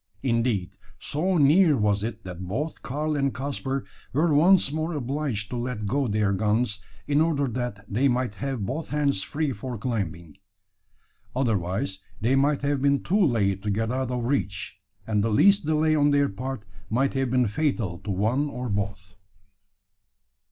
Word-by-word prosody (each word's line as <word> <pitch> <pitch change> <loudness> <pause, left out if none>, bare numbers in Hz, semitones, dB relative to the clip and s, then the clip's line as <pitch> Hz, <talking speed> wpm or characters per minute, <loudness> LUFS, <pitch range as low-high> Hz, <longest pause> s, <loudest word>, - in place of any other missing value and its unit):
Indeed, 115 -7 0 0.2
so 180 +5 0
near 155 +1 +5
was 105 -2 +1
it, 115 +2 -4
that 90 0 -7
both 150 - -3
Karl 150 +3 -2
and 140 -1 +1
Caspar 135 0 -3 0.3
were 155 +4 +2
once 170 0 +5
more 160 +2 -2
obliged 135 -6 -2
to 125 - -2
let 120 -3 -3
go 135 +6 0
their 105 -2 +1
guns, 105 +2 +1 0.3
in 145 +1 +2
order 150 -4 +1
that 120 -4 -4
they 120 +8 +2
might 125 -3 0
have 135 -7 -2
both 150 +8 -3
hands 145 -8 +1
free 150 +5 -2
for 120 +3 -6
climbing. 90 - -4 1.0
Otherwise 95 -6 -1 0.2
they 120 +5 +2
might 140 +1 +2
have 140 -1 0
been 140 0 +2
too 200 +3 +2
late 100 - +1
to 105 - -3
get 110 +3 0
out 130 0 -1
of 125 -1 -2
reach, 100 -7 -2 0.2
and 105 -2 +1
the 115 - +1
least 195 - +4
delay 155 0 +3
on 145 -1 +4
their 145 0 +3
part 130 +3 -5 0.3
might 135 +5 +1
have 135 -1 0
been 125 -1 +2
fatal 105 - -1
to 105 - -8
one 110 +10 +1
or 125 -2 -5
both. 100 -1 -3
125 Hz, 165 wpm, -26 LUFS, 105-145 Hz, 1.0 s, near